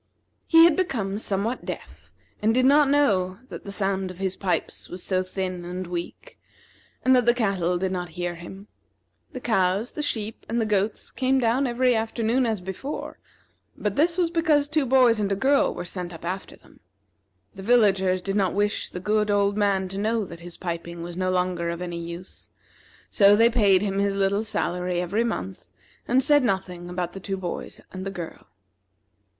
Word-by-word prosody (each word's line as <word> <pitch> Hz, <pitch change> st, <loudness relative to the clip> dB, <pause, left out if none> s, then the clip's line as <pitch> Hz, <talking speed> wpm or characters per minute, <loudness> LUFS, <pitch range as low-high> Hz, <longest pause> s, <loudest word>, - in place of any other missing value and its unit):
He 330 Hz, -1 st, +7 dB
had 340 Hz, -3 st, +5 dB
become 215 Hz, -, -1 dB
somewhat 215 Hz, +4 st, -2 dB
deaf, -, -, -8 dB, 0.3 s
and 220 Hz, +2 st, +2 dB
did 255 Hz, 0 st, +3 dB
not 285 Hz, +1 st, +5 dB
know 195 Hz, -11 st, +2 dB
that -, -, -9 dB
the 200 Hz, -, -5 dB
sound 195 Hz, -1 st, 0 dB
of 180 Hz, -, -9 dB
his 190 Hz, 0 st, -2 dB
pipes 180 Hz, -5 st, -3 dB
was 180 Hz, 0 st, -7 dB
so 185 Hz, -1 st, 0 dB
thin 185 Hz, -1 st, -4 dB
and 180 Hz, +1 st, -5 dB
weak, 175 Hz, 0 st, -7 dB, 0.7 s
and 260 Hz, 0 st, +6 dB
that 245 Hz, -2 st, +2 dB
the 240 Hz, -, +5 dB
cattle 190 Hz, -6 st, 0 dB
did 185 Hz, +1 st, -1 dB
not 180 Hz, -2 st, -3 dB
hear 175 Hz, 0 st, -2 dB
him. 190 Hz, +4 st, -10 dB, 0.7 s
The 255 Hz, -, -5 dB
cows, 200 Hz, -1 st, +1 dB
the 300 Hz, -, -4 dB
sheep, 220 Hz, -6 st, -3 dB
and 235 Hz, +1 st, 0 dB
the 225 Hz, -, +1 dB
goats 210 Hz, 0 st, -1 dB
came 265 Hz, 0 st, +1 dB
down 255 Hz, +2 st, +2 dB
every 250 Hz, +1 st, +2 dB
afternoon 230 Hz, +2 st, 0 dB
as 220 Hz, -4 st, -1 dB
before, 190 Hz, +11 st, -6 dB, 0.6 s
but 205 Hz, -1 st, -2 dB
this 335 Hz, +4 st, +2 dB
was 345 Hz, -2 st, +1 dB
because 315 Hz, -4 st, +2 dB
two 300 Hz, -2 st, +1 dB
boys 245 Hz, -3 st, +5 dB
and 200 Hz, -1 st, 0 dB
a -, -, +2 dB
girl 275 Hz, +7 st, +3 dB
were -, -, -6 dB
sent 180 Hz, -1 st, -5 dB
up 165 Hz, -, -10 dB
after 185 Hz, +3 st, -4 dB
them. -, -, -22 dB, 0.7 s
The 195 Hz, -, -10 dB
villagers 195 Hz, -5 st, +3 dB
did 195 Hz, 0 st, -2 dB
not 195 Hz, -3 st, +1 dB
wish 205 Hz, +1 st, 0 dB
the 180 Hz, -, -6 dB
good 210 Hz, +2 st, +1 dB
old 200 Hz, 0 st, +2 dB
man 200 Hz, -2 st, +1 dB
to 195 Hz, +1 st, -5 dB
know 220 Hz, +1 st, 0 dB
that 170 Hz, -2 st, -10 dB
his 175 Hz, 0 st, -10 dB
piping 170 Hz, -1 st, -5 dB
was 175 Hz, 0 st, -7 dB
no 185 Hz, 0 st, -1 dB
longer 180 Hz, -2 st, 0 dB
of 170 Hz, 0 st, -4 dB
any 175 Hz, -1 st, -4 dB
use, 170 Hz, +2 st, -8 dB, 0.6 s
so 200 Hz, -1 st, +6 dB
they 230 Hz, +2 st, +5 dB
paid 205 Hz, -5 st, +4 dB
him 195 Hz, -1 st, -1 dB
his 200 Hz, 0 st, +1 dB
little 200 Hz, +2 st, +1 dB
salary 180 Hz, -4 st, -1 dB
every 190 Hz, +6 st, 0 dB
month, 95 Hz, -, -4 dB, 0.4 s
and 255 Hz, +2 st, +3 dB
said 290 Hz, +1 st, +5 dB
nothing 185 Hz, -5 st, -2 dB
about 180 Hz, -1 st, -3 dB
the 195 Hz, -, -7 dB
two 195 Hz, 0 st, -4 dB
boys 180 Hz, -2 st, -5 dB
and 185 Hz, 0 st, -6 dB
the 195 Hz, -, -3 dB
girl. 175 Hz, -4 st, -8 dB
195 Hz, 190 wpm, -25 LUFS, 180-230 Hz, 0.7 s, He